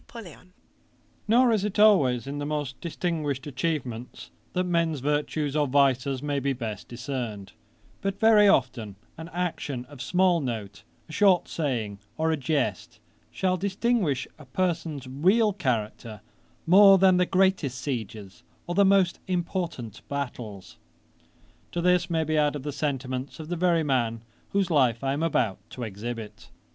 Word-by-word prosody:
] -, -, -37 dB
Nor 240 Hz, +3 st, +5 dB
is 215 Hz, -3 st, +1 dB
it 210 Hz, 0 st, -3 dB
always 145 Hz, -, +4 dB
in 140 Hz, +1 st, -5 dB
the 145 Hz, -, -3 dB
most 145 Hz, -3 st, -4 dB
distinguished 155 Hz, -5 st, -2 dB
atchievements 130 Hz, -5 st, -4 dB, 0.2 s
that 180 Hz, -, +1 dB
men's 170 Hz, -4 st, 0 dB
virtues 145 Hz, +1 st, -1 dB
or 150 Hz, -1 st, +2 dB
vices 135 Hz, 0 st, +2 dB
may 145 Hz, -1 st, -1 dB
be 135 Hz, 0 st, 0 dB
best 110 Hz, -6 st, -6 dB
discerned; 120 Hz, -5 st, -5 dB, 0.5 s
but 195 Hz, 0 st, -3 dB
very 220 Hz, -2 st, +6 dB
often 120 Hz, -, +1 dB, 0.2 s
an 165 Hz, +1 st, -9 dB
action 160 Hz, -7 st, -3 dB
of 140 Hz, -1 st, -12 dB
small 180 Hz, +4 st, +2 dB
note, 105 Hz, -6 st, -5 dB, 0.3 s
a -, -, -12 dB
short 190 Hz, 0 st, +3 dB
saying, 115 Hz, -10 st, -3 dB, 0.2 s
or 160 Hz, +1 st, +1 dB
a -, -, +2 dB
jest, 125 Hz, -6 st, -2 dB, 0.3 s
shall 185 Hz, -1 st, 0 dB
distinguish 195 Hz, -, 0 dB
a 150 Hz, -, -12 dB
person's 160 Hz, -1 st, -2 dB
real 190 Hz, -, +2 dB
character 115 Hz, -, -3 dB, 0.4 s
more 195 Hz, +3 st, +8 dB
than 185 Hz, -1 st, +5 dB
the 180 Hz, 0 st, +2 dB
greatest 185 Hz, -9 st, +1 dB
sieges, 110 Hz, -7 st, -5 dB, 0.2 s
or 175 Hz, -, -3 dB
the 200 Hz, +3 st, +4 dB
most 195 Hz, -2 st, +3 dB
important 170 Hz, -, -3 dB
battles.' 120 Hz, -8 st, -6 dB, 1.0 s
To 175 Hz, -, -1 dB
this 180 Hz, 0 st, +2 dB
may 165 Hz, -1 st, +1 dB
be 155 Hz, 0 st, 0 dB
added 145 Hz, -2 st, 0 dB
the 145 Hz, -, -3 dB
sentiments 135 Hz, -2 st, -3 dB
of 155 Hz, 0 st, -8 dB
the 175 Hz, -, -1 dB
very 170 Hz, -1 st, +2 dB
man 120 Hz, -5 st, 0 dB, 0.3 s
whose 195 Hz, -3 st, 0 dB
life 130 Hz, -6 st, +2 dB
I 135 Hz, 0 st, 0 dB
am 145 Hz, -, -2 dB
about 120 Hz, -11 st, 0 dB
to 125 Hz, -, -7 dB
exhibit. 110 Hz, 0 st, -7 dB
145 Hz, 150 wpm, -26 LUFS, 125-180 Hz, 1.0 s, more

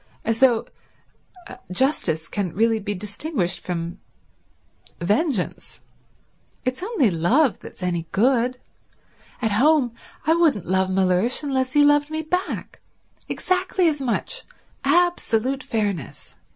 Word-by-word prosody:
As 225 Hz, 0 st, 0 dB
though 245 Hz, -4 st, +4 dB, 1.1 s
justice 180 Hz, -, +1 dB
can 195 Hz, -5 st, -3 dB
really 225 Hz, +2 st, +2 dB
be 205 Hz, 0 st, -3 dB
distinguished 200 Hz, -, -2 dB
from 170 Hz, -1 st, -4 dB, 1.0 s
vengeance. 210 Hz, -, -1 dB, 0.9 s
It's 255 Hz, +3 st, -2 dB
only 365 Hz, -, +1 dB
love 220 Hz, -, +2 dB
that's -, -, -11 dB
any 170 Hz, -2 st, -1 dB
good. 250 Hz, +3 st, +2 dB, 0.9 s
At 220 Hz, -, +1 dB
home 260 Hz, +2 st, +3 dB, 0.3 s
I 320 Hz, -, +4 dB
wouldn't 320 Hz, -, +2 dB
love 190 Hz, +1 st, +1 dB
Mellersh 190 Hz, +8 st, +2 dB
unless 260 Hz, -2 st, -1 dB
he 295 Hz, -, +5 dB
loved 290 Hz, 0 st, +4 dB
me 315 Hz, 0 st, -3 dB
back, 360 Hz, +4 st, -3 dB, 0.5 s
exactly 370 Hz, -1 st, +1 dB
as 295 Hz, -3 st, 0 dB
much, 270 Hz, -, -2 dB, 0.4 s
absolute 275 Hz, -7 st, +2 dB
fairness. 205 Hz, -, -3 dB
240 Hz, 110 wpm, -23 LUFS, 190-295 Hz, 1.1 s, he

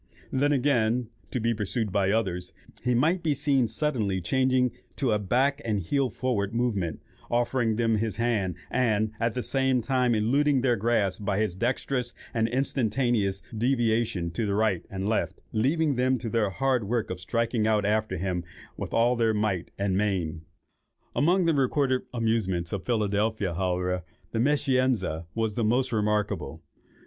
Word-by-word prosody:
Then, 145 Hz, +2 st, +2 dB
again, 125 Hz, -4 st, +2 dB, 0.2 s
to 125 Hz, -, -2 dB
be 115 Hz, +1 st, +1 dB
pursued 105 Hz, 0 st, -2 dB
by 100 Hz, 0 st, +2 dB
others, 95 Hz, -5 st, -1 dB, 0.3 s
he 125 Hz, 0 st, +2 dB
might 165 Hz, +9 st, +2 dB
be 155 Hz, -3 st, +1 dB
seen 140 Hz, -3 st, +2 dB
suddenly 110 Hz, -6 st, -1 dB
changing 130 Hz, +5 st, +2 dB, 0.2 s
to 130 Hz, -5 st, 0 dB
the 105 Hz, -, +2 dB
back 135 Hz, +8 st, +1 dB
and 110 Hz, -3 st, 0 dB
heel 130 Hz, -, 0 dB
forward 110 Hz, -2 st, -2 dB
movement, 105 Hz, -9 st, -1 dB, 0.3 s
offering 120 Hz, -1 st, +1 dB
them 115 Hz, -1 st, +2 dB
his 110 Hz, -1 st, -1 dB
hand, 110 Hz, -7 st, 0 dB, 0.2 s
and, 110 Hz, -4 st, +1 dB
at 115 Hz, 0 st, 0 dB
the 125 Hz, -, -2 dB
same 130 Hz, -2 st, +1 dB
time, 125 Hz, -1 st, +2 dB
eluding 135 Hz, +5 st, +2 dB
their 125 Hz, -2 st, +3 dB
grasp 105 Hz, -3 st, 0 dB
by 100 Hz, -1 st, 0 dB
his 110 Hz, -5 st, 0 dB
dexterous 125 Hz, +4 st, -2 dB, 0.2 s
and 115 Hz, -1 st, +1 dB
instantaneous 120 Hz, -5 st, 0 dB
deviations 115 Hz, -7 st, +1 dB
to 110 Hz, +5 st, -1 dB
the 100 Hz, -, 0 dB
right 105 Hz, -4 st, +1 dB
and 95 Hz, 0 st, -3 dB
left, 110 Hz, -, -1 dB
leaving 140 Hz, +5 st, +1 dB
them 130 Hz, +1 st, +2 dB
to 115 Hz, -2 st, -5 dB
their 110 Hz, -3 st, +2 dB
hard 130 Hz, +2 st, 0 dB
work 115 Hz, 0 st, -1 dB
of 90 Hz, -, -4 dB
striking 115 Hz, +3 st, 0 dB
out 105 Hz, -2 st, +2 dB
after 105 Hz, -2 st, 0 dB
him 90 Hz, 0 st, -2 dB, 0.3 s
with -, -, -4 dB
all 120 Hz, +2 st, +4 dB
their 115 Hz, -2 st, +2 dB
might 105 Hz, -4 st, -1 dB
and 100 Hz, -1 st, 0 dB
main." 95 Hz, -6 st, -1 dB, 0.7 s
Among 175 Hz, +5 st, +3 dB
the 165 Hz, -, +3 dB
recorded 135 Hz, -1 st, +2 dB
amusements 110 Hz, -8 st, 0 dB
of 100 Hz, -, -3 dB
Philadelphia, 105 Hz, -3 st, 0 dB
however, 90 Hz, 0 st, -1 dB, 0.3 s
the 115 Hz, -, -1 dB
"Meschianza" 130 Hz, -, +1 dB
is 110 Hz, -2 st, 0 dB
the 115 Hz, -, -1 dB
most 125 Hz, +4 st, +2 dB
remarkable. 105 Hz, -2 st, -1 dB
115 Hz, 160 wpm, -27 LUFS, 100-130 Hz, 0.7 s, all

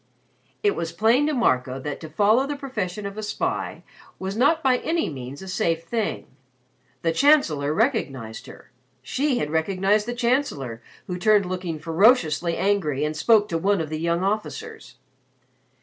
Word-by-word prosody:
It 410 Hz, -1 st, +3 dB
was 165 Hz, 0 st, -3 dB
plain 230 Hz, -, +3 dB
to 305 Hz, -, 0 dB
Marco 130 Hz, -, +1 dB
that 145 Hz, +1 st, -5 dB
to 160 Hz, -, -9 dB
follow 215 Hz, -, +3 dB
the 290 Hz, -, -3 dB
profession 215 Hz, -8 st, -4 dB
of 200 Hz, +2 st, -6 dB
a -, -, -3 dB
spy 210 Hz, -, -3 dB, 0.3 s
was 190 Hz, +1 st, -4 dB
not 290 Hz, +8 st, +3 dB
by 255 Hz, -2 st, +4 dB
any 330 Hz, 0 st, -1 dB
means 135 Hz, +2 st, -8 dB
a -, -, -9 dB
safe 165 Hz, -3 st, -1 dB
thing. 220 Hz, +5 st, -2 dB, 0.8 s
The 165 Hz, -, +2 dB
Chancellor 165 Hz, -, +3 dB
had 150 Hz, +2 st, -1 dB
recognized 135 Hz, -, -1 dB
her -, -, -14 dB, 0.3 s
she 265 Hz, -, 0 dB
had 150 Hz, -7 st, -2 dB
recognized 195 Hz, +6 st, +1 dB
the 240 Hz, -, -3 dB
Chancellor 235 Hz, -, -1 dB, 0.2 s
who 180 Hz, -1 st, -5 dB
turned 210 Hz, 0 st, +4 dB
looking 180 Hz, -3 st, -4 dB
ferociously 170 Hz, -, +3 dB
angry 160 Hz, -8 st, 0 dB
and 155 Hz, +1 st, -3 dB
spoke 210 Hz, +5 st, +4 dB
to 165 Hz, -, -1 dB
one 200 Hz, +3 st, +2 dB
of 160 Hz, -2 st, -3 dB
the 155 Hz, 0 st, -4 dB
young 170 Hz, +2 st, 0 dB
officers. 440 Hz, -, -4 dB
190 Hz, 165 wpm, -24 LUFS, 160-240 Hz, 0.8 s, by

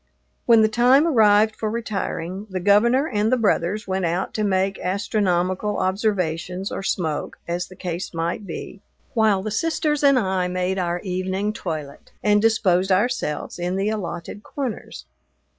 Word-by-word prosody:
When 230 Hz, -2 st, +7 dB
the -, -, +5 dB
time 245 Hz, +7 st, +4 dB
arrived 215 Hz, -7 st, +4 dB
for 215 Hz, -, -2 dB
retiring, 205 Hz, -4 st, -4 dB
the 185 Hz, -1 st, -3 dB
Governor 235 Hz, -, +4 dB
and 215 Hz, -2 st, 0 dB
the 255 Hz, -, +4 dB
brothers 210 Hz, -2 st, 0 dB
went 190 Hz, 0 st, -1 dB
out 175 Hz, +2 st, -1 dB
to 215 Hz, -, -1 dB
make 195 Hz, -1 st, 0 dB
astronomical 190 Hz, 0 st, 0 dB
observations 185 Hz, -2 st, -1 dB
or -, -, -4 dB
smoke, 165 Hz, -5 st, -2 dB
as 175 Hz, +1 st, -2 dB
the 185 Hz, -, -13 dB
case 175 Hz, 0 st, -4 dB
might 170 Hz, +4 st, -3 dB
be, 195 Hz, +3 st, -7 dB, 0.3 s
while 215 Hz, -5 st, +2 dB
the 215 Hz, -, -3 dB
sisters 300 Hz, +3 st, 0 dB
and 275 Hz, -2 st, +6 dB
I 190 Hz, -5 st, 0 dB
made 185 Hz, +1 st, -1 dB
our 175 Hz, -1 st, -1 dB
evening 190 Hz, +2 st, -2 dB
toilet, 155 Hz, -8 st, -6 dB
and 210 Hz, 0 st, +4 dB
disposed 195 Hz, -4 st, +2 dB
ourselves 185 Hz, -, 0 dB
in 175 Hz, +1 st, -1 dB
the 195 Hz, +2 st, 0 dB
allotted 195 Hz, -2 st, -5 dB
corners. 255 Hz, -2 st, -6 dB
195 Hz, 155 wpm, -22 LUFS, 180-215 Hz, 0.3 s, When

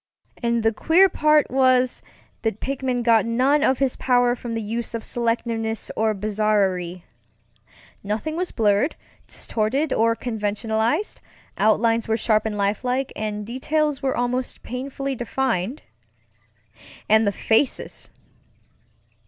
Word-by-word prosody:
And 235 Hz, -1 st, 0 dB
the 225 Hz, 0 st, +2 dB
queer 350 Hz, -, +4 dB
part 305 Hz, -4 st, +3 dB
was, 255 Hz, -1 st, +3 dB, 0.4 s
that 220 Hz, -2 st, -2 dB
Pickman 260 Hz, -2 st, -2 dB
got 230 Hz, -2 st, +4 dB
none 255 Hz, +6 st, +2 dB
of 260 Hz, -1 st, +3 dB
his 270 Hz, -1 st, 0 dB
power 245 Hz, -1 st, +2 dB
from 235 Hz, -1 st, -6 dB
the 225 Hz, -, -2 dB
use 230 Hz, +2 st, -4 dB
of 225 Hz, -, -4 dB
selectiveness 230 Hz, -1 st, -2 dB
or 220 Hz, -1 st, +1 dB
bizarrerie. 195 Hz, -4 st, 0 dB, 1.0 s
Nothing 220 Hz, +10 st, -3 dB
was 360 Hz, +1 st, -2 dB
blurred, 210 Hz, +6 st, +1 dB, 0.3 s
distorted, 260 Hz, +7 st, -1 dB
or 230 Hz, +1 st, +2 dB
conventionalized; 220 Hz, -, -2 dB, 0.3 s
outlines 225 Hz, +1 st, +2 dB
were 220 Hz, 0 st, +1 dB
sharp 220 Hz, -1 st, +1 dB
and 210 Hz, -1 st, -4 dB
lifelike, 250 Hz, +6 st, -1 dB
and 210 Hz, -1 st, -4 dB
details 295 Hz, +5 st, -1 dB
were 265 Hz, -1 st, -1 dB
almost 245 Hz, +1 st, -2 dB
painfully 270 Hz, +2 st, -4 dB
defined. 245 Hz, -2 st, -2 dB, 1.2 s
And 220 Hz, 0 st, +4 dB
the -, -, +3 dB
faces! 225 Hz, +6 st, -1 dB
235 Hz, 120 wpm, -23 LUFS, 215-260 Hz, 1.2 s, queer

